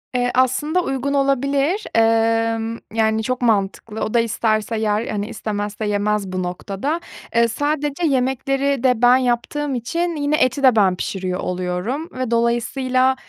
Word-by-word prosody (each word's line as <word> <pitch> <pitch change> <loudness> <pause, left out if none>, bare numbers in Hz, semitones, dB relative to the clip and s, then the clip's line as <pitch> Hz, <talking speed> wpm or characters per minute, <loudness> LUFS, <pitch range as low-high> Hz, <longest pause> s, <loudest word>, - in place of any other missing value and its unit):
Eee, 245 0 +1
aslında 295 +7 +2
uygun 270 0 -2
olabilir. 275 - +1
Emm, 225 0 +2
yani, 220 0 +1
çok 255 +2 -2
mantıklı. 215 -1 0
O 215 - -2
da 235 - +4
isterse 225 0 0
yer, 215 +1 0
hani, 210 0 -3
istemezse 210 -1 -4
yemez 210 0 0
bu 185 0 -2
noktada. 200 - -3 0.4
Iıı, 235 0 +4
sadece 295 +4 -1
yemekleri 270 0 0
de 250 -3 +2
ben 245 +1 +6
yaptığım 260 +3 -1
için 335 +9 -2
yine 290 0 +1
eti 255 -1 +1
de 255 -3 +6
ben 195 -4 +4
pişiriyor 185 0 -3
oluyorum 180 - -3
ve 255 -2 -4
dolayısıyla 255 +3 +1
235 Hz, 145 wpm, -20 LUFS, 215-275 Hz, 0.4 s, ben